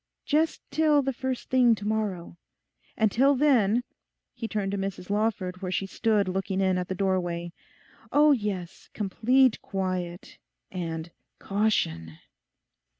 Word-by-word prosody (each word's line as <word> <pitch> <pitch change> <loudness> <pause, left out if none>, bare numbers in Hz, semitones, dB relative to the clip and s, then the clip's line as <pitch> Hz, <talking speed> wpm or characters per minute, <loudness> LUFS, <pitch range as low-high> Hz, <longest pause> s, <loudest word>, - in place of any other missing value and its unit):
Just 310 +2 +1
till 300 -1 +3
the 270 0 -1
first 260 0 -4
thing 245 -3 +5
to 205 -1 -6
morrow. 205 -6 -2 0.6
And 220 -2 +3
till 275 +6 +4
then,' 245 -5 +3 0.5
he 230 - -5
turned 205 -3 -2
to 200 - -2
Mrs 195 -1 -4
Lawford, 205 -4 -1
where 185 -1 -3
she 195 - -1
stood 210 0 +1
looking 190 +1 -2
in 190 -1 +2
at 180 - -3
the 190 - -3
doorway, 175 -3 -1 0.6
'oh 295 +1 +5
yes, 205 -8 -3
complete 235 +5 +2
quiet; 185 -3 -4 0.3
and 165 -2 -5 0.3
caution! 80 - -1
200 Hz, 135 wpm, -27 LUFS, 185-240 Hz, 0.6 s, thing